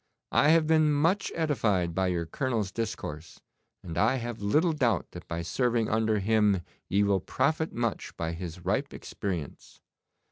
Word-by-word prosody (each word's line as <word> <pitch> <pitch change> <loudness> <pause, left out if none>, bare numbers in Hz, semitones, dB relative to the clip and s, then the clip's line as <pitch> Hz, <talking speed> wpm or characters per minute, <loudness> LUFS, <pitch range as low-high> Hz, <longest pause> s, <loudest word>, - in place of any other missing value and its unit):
'I 145 - +4
have 160 0 +5
been 155 -1 +4
much 165 +7 +1
edified 110 - +1
by 95 +2 +1
your 85 -2 -1
Colonel's 110 +2 -2
discourse, 85 -8 -5 0.4
and 85 -1 -4
I 130 - +3
have 120 -3 -5
little 155 - +2
doubt 120 - 0
that 90 - -10
by 85 0 -3
serving 120 +4 0
under 110 0 +2
him 105 -2 +2 0.3
ye 100 +3 +3
will 100 -1 +2
profit 160 - 0
much 115 -3 -3
by 80 0 -2
his 85 0 -7
ripe 135 +9 -1
experience. 90 -8 -6
110 Hz, 155 wpm, -28 LUFS, 90-135 Hz, 0.4 s, have